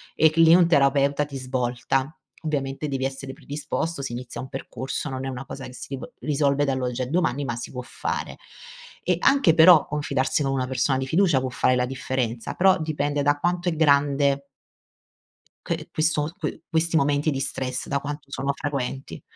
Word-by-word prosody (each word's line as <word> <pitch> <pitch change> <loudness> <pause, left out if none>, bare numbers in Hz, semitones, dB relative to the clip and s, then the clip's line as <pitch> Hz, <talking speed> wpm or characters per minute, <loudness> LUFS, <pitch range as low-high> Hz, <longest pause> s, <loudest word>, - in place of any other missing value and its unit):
e 160 -1 +5
c 155 - -12
lì 165 0 +8
un 175 -1 +5
terapeuta 140 -2 +3
ti 140 -2 -7
svolta, 130 +2 -2 0.3
ovviamente 140 -1 -2
devi 135 -2 -2
essere 135 0 -5
predisposto, 150 +3 -4
si 135 -3 -4
inizia 125 0 -6
un 130 - -8
percorso 130 +4 -5
non 130 0 -4
è - - -2
una 130 0 -6
cosa 135 - -7
che 125 - -10
si - - -8
riv 135 -1 -6
risolve 145 -1 +1
dall'oggi 130 -2 -1
al 125 - -5
domani 145 -5 +1
ma 120 -3 -2
si 120 - -6
può 125 - -5
fare, - - -4 0.7
e - - +1
anche 275 - +4
però 160 -1 +7
confidarsi 145 -2 0
con 135 - 0
una 130 -1 0
persona 130 +1 +1
di 130 - -2
fiducia 165 0 +3
può 130 - -2
fare 125 +1 +2
la 125 0 +1
differenza, 125 -2 -3
però 190 0 +4
dipende 145 -2 -1
da 145 +1 +2
quanto 175 +2 0
è 165 - -2
grande 140 -2 +3 1.2
que - - -3
questo, 155 -1 0
que 155 -5 -4
questi 165 +1 +1
momenti 145 +1 +2
di 135 - -2
stress 130 -2 -3
da 140 - 0
quanto 145 0 -7
sono 140 0 -1
frequenti. 135 -2 -4
140 Hz, 185 wpm, -24 LUFS, 130-150 Hz, 1.2 s, lì